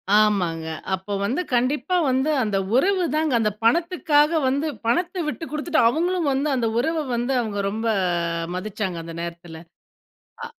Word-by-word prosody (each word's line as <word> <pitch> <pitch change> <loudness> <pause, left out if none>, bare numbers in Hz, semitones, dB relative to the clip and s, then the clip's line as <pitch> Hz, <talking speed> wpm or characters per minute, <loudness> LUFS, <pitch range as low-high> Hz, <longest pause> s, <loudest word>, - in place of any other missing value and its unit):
ஆமாங்க. 185 -7 +2 0.3
அப்ப 190 +2 -3
வந்து 260 - 0
கண்டிப்பா 265 +7 +1
வந்து 265 +4 +1
அந்த 210 -3 0 0.2
உறவுதாங்க 320 -2 +2
அந்த 215 -1 +1
பணத்துக்காக 310 +1 +3 0.2
வந்து, 280 +4 0 0.2
பணத்த 350 +7 0
விட்டு 300 - -4
குடுத்துட்டு 310 +1 +1
அவங்களும் 340 +2 0
வந்து 280 +3 0
அந்த 235 -3 0
உறவ 315 +4 0
வந்து, 240 +3 -1
அவுங்க 205 -3 -3
ரொம்ப 225 +2 -3 0.7
மதிச்சாங்க 190 -1 -3
அந்த 165 0 -8
நேரத்தில. 170 -1 -7 0.9
ஆ. - - -4
260 Hz, 135 wpm, -23 LUFS, 210-315 Hz, 0.9 s, பணத்துக்காக